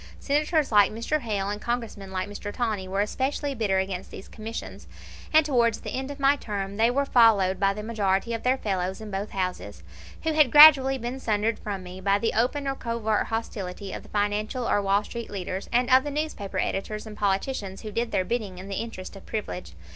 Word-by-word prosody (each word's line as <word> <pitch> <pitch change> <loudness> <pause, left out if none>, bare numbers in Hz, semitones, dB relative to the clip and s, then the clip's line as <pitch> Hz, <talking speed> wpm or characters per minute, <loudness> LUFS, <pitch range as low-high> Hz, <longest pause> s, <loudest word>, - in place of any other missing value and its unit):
Senators 300 0 +1
like 205 -2 +5
Mr. 230 +8 -1
Hale 205 -6 -2
and 205 +1 -4
Congressmen 230 -5 -4
like 185 0 -2
Mr. 205 0 -6
Tawney 215 -6 -2
were 195 +2 0
especially 270 +6 -1
bitter 210 -6 0
against 190 -1 -3
these - - -10
commissions; 225 +1 -7 0.4
and 315 -1 +5
towards 235 -6 +2
the - - -6
end 265 +1 -3
of 285 0 -7
my 275 +1 +4
term 200 -6 -5
they 225 +1 +4
were 280 +3 +1
followed 210 -8 +4
by 195 0 +3
the 210 +1 -6
majority 210 0 0
of 230 - -3
their 255 +1 +2
fellows 190 -4 -2
in 215 -1 -8
both 195 +2 -3
houses, 180 - -4 0.4
who 320 - 0
had 305 -4 +5
gradually 275 -3 +9
been 245 +2 -5
sundered 220 -1 0
from 200 -3 -5
me 180 +1 -9
by 200 +1 +3
the 225 +2 -1
open 270 +5 0
or 270 - +1
covert 230 -4 -1
hostility 200 -4 -4
of - - -5
the - - -16
financial 210 +4 -1
or 205 - +2
Wall 200 +1 +2
Street 235 +1 -7
leaders, 190 -1 -5
and 245 +1 +2
of 260 0 +7
the 290 - -3
newspaper 290 -9 -4
editors 215 +3 -2
and 215 -1 -9
politicians 195 0 -2
who 215 - -6
did 230 +2 -2
their 185 - +1
bidding 215 -5 -3
in 190 +2 -9
the 195 - -2
interest 215 -5 -7
of 195 - -13
privilege. 90 - -5
215 Hz, 210 wpm, -26 LUFS, 195-245 Hz, 0.4 s, gradually